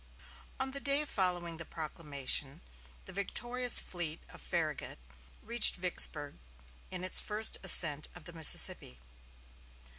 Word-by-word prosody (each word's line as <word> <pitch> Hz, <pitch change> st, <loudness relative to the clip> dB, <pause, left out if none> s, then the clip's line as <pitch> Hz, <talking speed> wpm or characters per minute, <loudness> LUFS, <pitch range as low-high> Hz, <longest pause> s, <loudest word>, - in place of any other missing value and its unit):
On 265 Hz, 0 st, -3 dB
the 280 Hz, -, -5 dB
day 280 Hz, +2 st, +1 dB
following 175 Hz, -, -4 dB
the 170 Hz, -, -8 dB
proclamation 145 Hz, -4 st, -5 dB, 0.4 s
the -, -, -12 dB
victorious 240 Hz, +6 st, 0 dB
fleet 170 Hz, -3 st, -7 dB
of -, -, -15 dB
Farragut 160 Hz, -4 st, -6 dB, 0.5 s
reached 235 Hz, +1 st, +3 dB
Vicksburg 160 Hz, -5 st, +1 dB, 0.5 s
in 185 Hz, -1 st, -9 dB
its 185 Hz, -, +3 dB
first 215 Hz, +1 st, -2 dB
ascent 155 Hz, -5 st, +5 dB
of 175 Hz, -, -13 dB
the 175 Hz, -, -13 dB
Mississippi. 150 Hz, -, +2 dB
175 Hz, 120 wpm, -30 LUFS, 155-215 Hz, 0.5 s, ascent